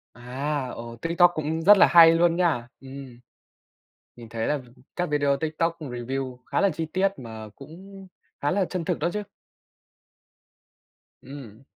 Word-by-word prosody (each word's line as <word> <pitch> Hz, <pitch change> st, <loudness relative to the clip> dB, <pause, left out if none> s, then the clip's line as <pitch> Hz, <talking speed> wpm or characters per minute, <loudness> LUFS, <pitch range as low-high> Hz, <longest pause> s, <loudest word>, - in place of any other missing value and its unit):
À, 130 Hz, +3 st, -4 dB
ồ. 115 Hz, 0 st, -9 dB
TikTok 170 Hz, +1 st, +4 dB
cũng 155 Hz, +1 st, -3 dB
rất 205 Hz, +4 st, +8 dB
là -, -, +8 dB
hay 165 Hz, -1 st, +7 dB
luôn 170 Hz, 0 st, +3 dB
nha! 150 Hz, -10 st, 0 dB
Ừm. 135 Hz, -2 st, -11 dB, 1.0 s
Mình 115 Hz, -2 st, -12 dB
thấy 115 Hz, 0 st, -3 dB
là 150 Hz, -, 0 dB, 0.4 s
các 180 Hz, 0 st, 0 dB
video 145 Hz, -1 st, +1 dB
Tiktok 160 Hz, +2 st, -2 dB
review 130 Hz, -1 st, -5 dB
khá -, -, -1 dB
là 200 Hz, -1 st, +3 dB
chi 160 Hz, +1 st, -4 dB
tiết 195 Hz, +1 st, +2 dB
mà 110 Hz, -3 st, -9 dB
cũng 190 Hz, +7 st, -13 dB, 0.3 s
khá 145 Hz, -, 0 dB
là 190 Hz, +1 st, +1 dB
chân 180 Hz, -2 st, -4 dB
thực -, -, -1 dB
đó 170 Hz, -, 0 dB
chứ. 210 Hz, -, -3 dB, 2.0 s
Ừm. 130 Hz, -5 st, -11 dB
150 Hz, 155 wpm, -25 LUFS, 125-170 Hz, 2.0 s, rất